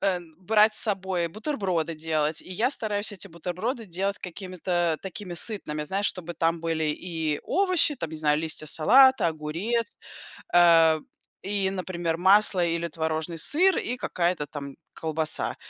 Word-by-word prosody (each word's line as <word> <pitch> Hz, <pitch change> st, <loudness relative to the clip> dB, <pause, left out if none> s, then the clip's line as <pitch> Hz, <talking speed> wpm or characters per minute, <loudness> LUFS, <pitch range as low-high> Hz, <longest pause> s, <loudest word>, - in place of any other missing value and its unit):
а, 185 Hz, -2 st, 0 dB, 0.2 s
брать 215 Hz, +3 st, +4 dB
с -, -, 0 dB
собой 190 Hz, -5 st, -1 dB
бутерброды 190 Hz, -, -2 dB
делать, 155 Hz, -1 st, -1 dB
и -, -, -14 dB
я 235 Hz, +8 st, +1 dB
стараюсь 210 Hz, -5 st, -1 dB
эти 200 Hz, 0 st, -6 dB
бутерброды 185 Hz, -, -4 dB
делать 195 Hz, +3 st, -2 dB
какими-то 175 Hz, -3 st, -2 dB
такими 190 Hz, -1 st, -7 dB
сытными, 160 Hz, -6 st, -1 dB
знаешь, 195 Hz, +6 st, 0 dB
чтобы 175 Hz, -2 st, -3 dB
там 165 Hz, +1 st, 0 dB
были 165 Hz, -1 st, -1 dB
и 155 Hz, -1 st, -2 dB
овощи- 365 Hz, -6 st, +2 dB
там, 165 Hz, -6 st, -5 dB
не 160 Hz, -, -6 dB
знаю, 150 Hz, -1 st, +2 dB
листья 155 Hz, -1 st, -3 dB
салата, 260 Hz, -, +5 dB
огурец, 165 Hz, +10 st, -3 dB, 0.6 s
а, 165 Hz, -2 st, +6 dB, 0.4 s
и, 195 Hz, -1 st, 0 dB
например, 175 Hz, -3 st, -3 dB
масло 190 Hz, -1 st, +5 dB
или 170 Hz, 0 st, -1 dB
творожный 160 Hz, +1 st, -3 dB
сыр, 360 Hz, -, +3 dB
и 250 Hz, -, -2 dB
какая-то 170 Hz, -8 st, -1 dB
там 140 Hz, -1 st, -8 dB, 0.2 s
колбаса. 160 Hz, -1 st, -1 dB
175 Hz, 145 wpm, -26 LUFS, 160-205 Hz, 0.6 s, а